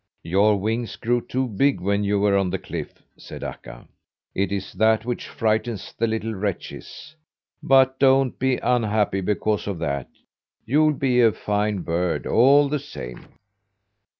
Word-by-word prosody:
"Your 100 +4 +3
wings 110 +3 -2
grew 120 +1 0
too 130 +2 -2
big 135 +6 +1
when 100 +2 0
you 100 0 +1
were 100 0 +2
on 95 -2 +1
the 95 - -2
cliff," - - -8
said - - -10
Akka. 60 0 -9 0.5
"It 100 +1 -1
is 100 -1 -4
that 110 0 +2
which 120 0 -4
frightens 110 -1 -2
the 115 - 0
little 110 0 -2
wretches. 105 - -6 0.5
But 130 -1 +4
don't 135 -1 +3
be 130 -1 +1
unhappy 110 -5 +1
because 105 +2 -1
of 100 -3 -3
that. 70 -5 -3 0.6
You'll 150 +6 +3
be 125 -2 +2
a 115 -2 +5
fine 105 -1 -1
bird 85 +1 -1
all 140 +4 +5
the 150 +1 -1
same." 60 - -9
110 Hz, 150 wpm, -23 LUFS, 100-125 Hz, 0.6 s, a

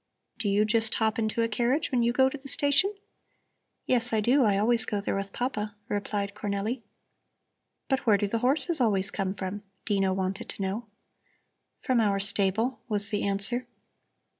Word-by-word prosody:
Do 210 - -1
you 205 +2 +2
just 225 0 +1
hop 220 0 0
into 225 +1 0
a - - +1
carriage 240 +6 0
when 250 -2 +1
you 235 0 +2
go 265 +2 +3
to 265 - -4
the 275 -1 -10
station?" 290 +10 +2 0.9
"Yes, 245 -2 +3
I 220 - +3
do; 255 +6 +3
I 205 -3 +2
always 230 +3 +4
go 205 - 0
there 200 - -2
with 195 0 -4
Papa," 215 -4 -3
replied 205 -1 -3
Cornelli. 210 +4 -3 1.1
"But 265 -1 +1
where 210 -2 +5
do 205 - -1
the 225 +3 -2
horses 280 +5 +2
always 200 -4 +1
come 190 -1 -2
from?" 195 +1 -5 0.2
Dino 195 -3 +1
wanted 190 +3 -3
to - - -6
know. 205 +5 -4 1.0
"From 255 -3 +2
our 200 -2 +1
stable," 200 +5 +1
was 205 -1 -1
the 205 - -1
answer. 220 +5 +3
215 Hz, 175 wpm, -27 LUFS, 200-245 Hz, 1.1 s, where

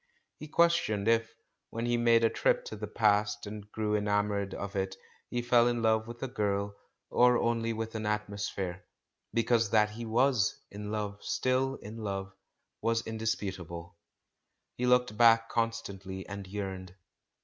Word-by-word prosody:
He 155 - -7
questioned 155 -12 +2
if, 115 0 +2 0.3
when 115 +1 -3
he 120 0 +2
made 115 -1 +4
a 115 - +5
trip - - +1
to 485 - -6
the - - -5
past 105 -2 +2
and 105 0 -8
grew 105 -1 0
enamoured 105 -1 0
of 100 0 -5
it, 95 0 -1 0.3
he 120 0 -2
fell 120 0 +5
in 120 -1 0
love 110 0 +2
with 120 +1 -8
a - - -1
girl, 100 -4 -1 0.4
or 125 0 +5
only 115 -1 0
with 115 0 -4
an 110 -1 -3
atmosphere. 100 -3 -3 0.5
Because 115 -1 +2
that 105 0 +3
he 115 +2 -6
was 120 0 +2
in 105 0 -6
love, 105 -1 -3
still 130 +1 +1
in 110 -1 -9
love, 95 -3 -4 0.5
was 115 +1 +1
indisputable; 95 -6 -4 0.8
he 125 - -1
looked 125 -3 +3
back 115 0 +6
constantly 100 -5 -3
and 100 -1 -7
yearned. 95 -2 -5
110 Hz, 155 wpm, -30 LUFS, 100-115 Hz, 0.8 s, back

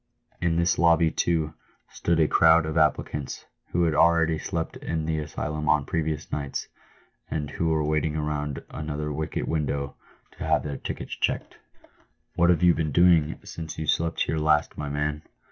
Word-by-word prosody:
In 85 -1 +1
this 85 +1 +2
lobby, 85 -1 +4
too, 80 -3 0 0.4
stood 85 -1 0
a 80 - +4
crowd 80 0 +5
of 80 0 -3
applicants, 75 -2 0 0.2
who 90 - 0
had 80 -2 +2
already 80 0 +3
slept 80 -1 -3
in 80 -1 -3
the 80 -1 -1
asylum 75 +1 -3
on 75 -3 +3
previous 80 -1 -2
nights, 70 -2 -3 0.6
and 75 -2 -3
who 85 - -1
were 80 -1 +1
waiting 75 0 0
round 75 -2 -3
another 75 -1 -4
wicket 75 +1 -3
window 70 -3 -1 0.4
to - - -8
have - - +2
their 70 -2 -4
tickets - - -6
checked. - - -2 0.4
" - - -38
What 85 0 +4
have 90 0 +3
you 90 -1 +7
been 80 -2 -1
doing 85 -1 +4
since 80 -2 -7
you 80 - -3
slept 80 +2 0
here 80 - 0
last, 75 -1 +2
my 75 -1 -4
man 75 +1 -2
80 Hz, 175 wpm, -26 LUFS, 75-80 Hz, 0.6 s, you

